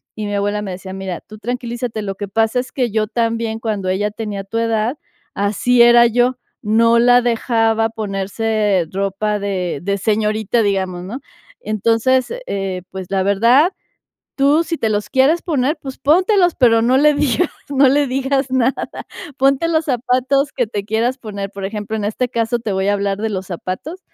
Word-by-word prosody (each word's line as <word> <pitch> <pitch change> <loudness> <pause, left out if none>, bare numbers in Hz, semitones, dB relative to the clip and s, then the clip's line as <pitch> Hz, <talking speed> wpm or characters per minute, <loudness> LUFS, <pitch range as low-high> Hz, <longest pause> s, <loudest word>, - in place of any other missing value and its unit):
Y 215 - -4
mi 205 - -2
abuela 205 +1 -1
me 200 -2 -5
decía: 190 +1 -7
"Mira, 190 -2 -5
tú 215 - -13
tranquilízate, 240 -1 -4
lo 195 -1 -4
que 205 +1 -5
pasa 225 +4 +1
es 250 - -5
que 250 -4 -1
yo 215 0 0
también 230 0 -1
cuando 210 -4 -3
ella 205 +3 0
tenía 210 -2 -5
tu 225 +4 -4
edad, 230 +3 0 0.4
así 215 +5 +2
era 240 0 +7
yo, 245 +2 +2 0.3
no 230 +2 +3
la 245 +1 +5
dejaba 225 -2 +1
ponerse 210 -2 -1
ropa 200 +2 -1
de 185 -6 -2
de 200 +1 -1
señorita, 215 +2 0
digamos, 190 -3 -1
¿no? 230 +8 -6 0.4
Entonces, 230 - +1
eh, 195 -2 -3
pues, 190 -1 -7
la 190 -1 +1
verdad, 235 - +4 0.7
tú 290 +4 +3
si 330 -1 -3
te 225 - 0
los 205 -1 -2
quieres 280 +5 +3
poner, 295 -2 0
pues 265 -1 -8
póntelos, 360 +4 +3
pero 230 -4 +4
no 250 +3 +3
le 300 +1 +5
digas 285 +5 +1 0.2
no 275 -1 +4
le 285 +2 +3
digas 270 +1 -1
nada. 260 0 +2 0.6
Ponte 275 +4 +3
los 320 -1 +1
zapatos 260 +2 +1
que 245 -3 0
te 205 -2 -4
quieras 225 +4 0
poner". 200 -4 -6
Por 200 -1 -7
ejemplo, 210 +2 -4
en 210 - -3
este 225 +4 -1
caso 230 0 -1
te 225 -3 -4
voy 190 +1 0
a 205 - +3
hablar 200 -1 -1
de 220 +1 -1
los 190 -2 -4
zapatos. 185 - -6
225 Hz, 180 wpm, -18 LUFS, 200-255 Hz, 0.7 s, era